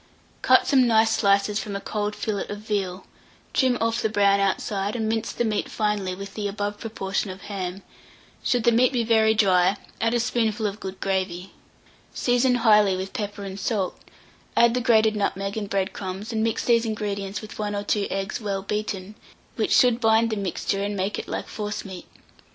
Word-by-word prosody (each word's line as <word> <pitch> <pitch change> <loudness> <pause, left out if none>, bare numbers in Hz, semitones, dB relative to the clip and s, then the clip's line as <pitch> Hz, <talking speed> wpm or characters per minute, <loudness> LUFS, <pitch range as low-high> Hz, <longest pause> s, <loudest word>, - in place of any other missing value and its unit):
Cut - - +5
some 260 -3 +4
nice 220 -1 +4
slices 200 0 +2
from 205 -2 -5
a - - -2
cold 210 +1 -3
fillet 210 -3 -3
of 205 - -4
veal, 200 -3 -3 0.5
trim 255 -2 +3
off 230 0 0
the 220 - +1
brown 200 -1 +3
outside, 195 +1 -1
and 220 -2 -1
mince 225 0 -1
the 240 - -1
meat 215 -2 -1
finely 210 -4 -1
with 195 +1 -8
the 210 -2 -3
above 205 0 -3
proportion 195 -3 -3
of 190 +1 -8
ham: 190 -2 -5 0.6
should 245 -2 +1
the 235 - +5
meat 245 +3 +4
be 245 -3 0
very 220 -1 +3
dry, 190 -2 +3 0.2
add 230 +1 +2
a - - +2
spoonful 225 -2 0
of 205 0 -2
good 190 -2 -7
gravy. 190 -1 -2 0.6
Season 245 +1 +2
highly 210 -5 +4
with 190 +1 -5
pepper 205 -1 -4
and 195 0 -6
salt, 195 -2 -1 0.6
add 235 0 +6
the 250 - 0
grated 220 -3 +4
nutmeg 195 -1 -1
and 210 -2 -4
bread 195 -1 -1
crumbs, 195 +4 -5
and 220 0 0
mix 225 -1 -1
these 230 -1 +4
ingredients 205 -3 -3
with 215 0 -10
1 205 -1 -2
or 205 - -2
2 205 0 0
eggs 195 +3 -3
well 195 -2 -2
beaten, 210 -1 -3 0.4
which - - -1
should 245 -1 +4
bind 225 0 +3
the - - 0
mixture 195 0 -2
and 205 0 -2
make 195 +2 -1
it - - -7
like - - -4
forcemeat. 210 -3 -6
210 Hz, 190 wpm, -24 LUFS, 195-225 Hz, 0.6 s, add